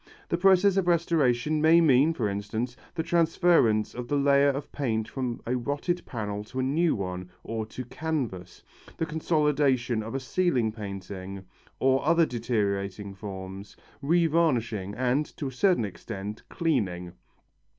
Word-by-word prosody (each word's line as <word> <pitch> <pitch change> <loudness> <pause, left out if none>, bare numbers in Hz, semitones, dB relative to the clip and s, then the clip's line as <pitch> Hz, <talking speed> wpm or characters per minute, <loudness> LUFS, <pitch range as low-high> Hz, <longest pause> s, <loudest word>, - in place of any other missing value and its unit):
The - - +1
process 190 +1 +4
of 190 -2 +1
restoration 155 -4 +2
may 160 +2 +6
mean, 145 -1 +5
for 115 -7 0
instance, 105 +5 -3 0.2
the 160 - -1
transference 165 -10 +3
of 125 0 -6
the 145 - 0
layer 140 0 +4
of 140 +1 -3
paint 110 -6 -1
from 125 -3 -3
a 125 - 0
rotted 145 +8 -2
panel 105 -3 -4
to 130 - -6
a - - +1
new 155 +5 +2
one 90 -2 -5
or 110 -1 -4
to 125 +3 -7
canvas, 125 - -4 0.3
the 160 - 0
consolidation 150 -7 +1
of 115 +4 -6
a - - 0
ceiling 130 -4 +1
painting 95 -2 -7 0.3
or 135 0 +3
other 165 +2 +4
deteriorating 100 -5 -2
forms, 95 0 -8 0.2
revarnishing 140 - +1
and, 130 +4 +1
to 145 - -4
a - - -9
certain 175 - +2
extent, 105 +1 -7
cleaning. 95 - -1
125 Hz, 145 wpm, -27 LUFS, 105-155 Hz, 0.3 s, may